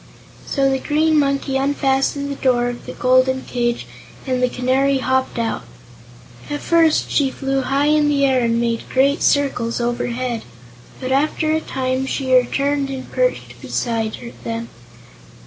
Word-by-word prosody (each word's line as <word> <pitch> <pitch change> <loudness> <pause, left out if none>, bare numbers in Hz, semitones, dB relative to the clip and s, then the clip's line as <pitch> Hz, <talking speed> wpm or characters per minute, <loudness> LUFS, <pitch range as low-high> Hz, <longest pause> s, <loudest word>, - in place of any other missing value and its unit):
So 275 -2 +1
the 265 - 0
Green 310 +2 +2
Monkey 275 -1 0
unfastened 275 +1 0
the - - -3
door 245 -3 +1
of 245 - -8
the - - -6
golden 255 +1 +2
cage 240 -1 -2 0.4
and 255 -2 -1
the 250 - +2
Canary 265 +3 +1
hopped 260 0 0
out. 230 -1 -1 0.9
At 290 0 -3
first 330 -2 +3
she 280 -2 +2
flew 270 0 -2
high 275 +2 +1
in 300 0 +3
the 280 -1 +2
air 260 -2 +2
and 230 0 +1
made 230 -1 -2
great 275 +2 +2
circles 250 -5 +1
overhead, 240 0 -2 0.6
but 260 0 -4
after 305 +3 +1
a 315 0 +1
time 260 -1 -2
she 265 -1 -1
returned 275 +3 +2
and 265 -1 -6
perched - - -1
beside 230 0 -3
them. 230 0 -4
265 Hz, 150 wpm, -20 LUFS, 250-280 Hz, 0.9 s, first